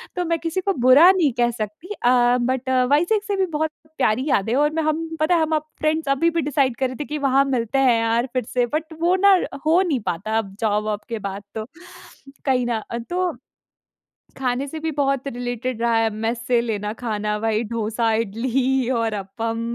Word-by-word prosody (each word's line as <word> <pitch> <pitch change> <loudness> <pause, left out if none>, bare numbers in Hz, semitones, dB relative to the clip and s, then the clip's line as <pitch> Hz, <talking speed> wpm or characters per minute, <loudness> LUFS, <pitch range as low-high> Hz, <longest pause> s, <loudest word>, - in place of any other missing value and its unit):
तो 360 -1 -1
मैं 335 -1 0
किसी 335 +3 -2
को 395 +1 0
बुरा 310 +8 +8
नहीं 335 -8 +2
कह 240 0 +3
सकती 225 - -6
अ, 245 0 +4
बट 260 +1 -1 0.2
वाइसेक 350 +8 +3
से 410 -2 -2
भी 380 -1 +1
बहुत 315 0 0 0.3
प्यारी 255 +1 +1
यादें 220 0 +1
हैं 275 - +2
और 295 +1 +3
मैं 320 -1 0
हम 310 +1 0 0.2
पता 345 +3 +3
है 330 - +2
हम 315 0 +1
फ्रेंड्स 310 0 -2
अभी 330 +5 +3
भी - - +3
डिसाइड 275 -4 +1
कर 265 - +1
रहे 255 - -7
थे - - -3
कि 300 - -4
वहाँ 270 +1 +4
मिलते 260 0 0
हैं 245 -4 +4
यार 230 +3 +1
फिर 255 - 0
से, 245 0 0
बट 315 +5 -4
वो 355 +2 +3
ना 390 -2 +7 0.3
हो 335 +4 +4
नहीं 310 -9 0
पाता 215 +6 -3
अब 195 -3 -6
जॉब 210 -1 +1
वोब 210 -1 -2
के 225 -2 -3
बाद 200 +1 -7
तो 215 0 -4 0.8
कहीं 255 -2 +2
ना। 230 -3 -2 0.3
तो 360 -1 0 1.0
खाने 260 +1 -1
से 315 +3 -6
भी 320 - -1
बहुत 275 -2 0
रिलेटेड 245 -1 -4
रहा 235 -1 +2
है, 225 0 +2
मेस 225 +2 -2
से 245 -2 +3
लेना 210 -3 -3
खाना। 210 -2 -2
वही 220 +1 0
डोसा, 225 0 -1
इडली 245 +4 0
और 225 -1 0
अपम 225 +3 -4
255 Hz, 205 wpm, -22 LUFS, 225-310 Hz, 1.0 s, बुरा